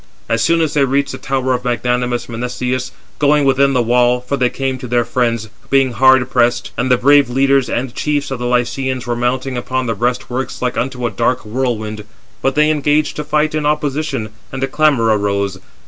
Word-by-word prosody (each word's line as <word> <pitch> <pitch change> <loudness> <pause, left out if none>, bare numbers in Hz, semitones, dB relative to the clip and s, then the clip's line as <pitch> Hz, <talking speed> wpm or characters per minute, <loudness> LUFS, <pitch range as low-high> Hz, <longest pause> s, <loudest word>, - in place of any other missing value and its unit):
As 115 0 0
soon 165 0 +3
as 155 -2 0
they 145 - +3
reached 140 +1 0
the - - -7
tower 130 -1 -1
of 125 0 -2
magnanimous 125 0 -1
Menestheus, 125 +2 -3 0.3
going 150 0 +3
within 135 +1 +3
the 125 -2 +2
wall 125 +1 +3
(for 125 +3 -3
they 125 -2 +1
came 135 0 -3
to 125 - -7
[their 120 0 +1
friends] 115 -2 -1 0.2
being 135 -2 +3
hard 130 +1 +4
pressed: 120 -1 +1
and 125 +1 -1
the 125 - +4
brave 140 +1 +4
leaders 135 +1 +2
and 125 0 -2
chiefs 145 -2 -2
of 130 - -3
the 120 - -2
Lycians 125 +1 -1
were 120 -1 -1
mounting 125 +2 -1
upon 130 +1 -2
the 115 - -1
breast 120 +3 -1
works 130 0 -4
like 125 -1 -2
unto 125 -1 -2
a 120 - -1
dark 125 0 -1
whirlwind), 110 -2 -3 0.4
but 135 0 0
they 150 +1 +4
engaged 150 0 +1
to 150 - -2
fight 150 +1 0
in 155 -1 -1
opposition, 150 -5 -1 0.2
and 135 0 -4
a - - +1
clamour 140 -4 +2
arose. 100 -2 -1
125 Hz, 205 wpm, -17 LUFS, 120-135 Hz, 0.4 s, hard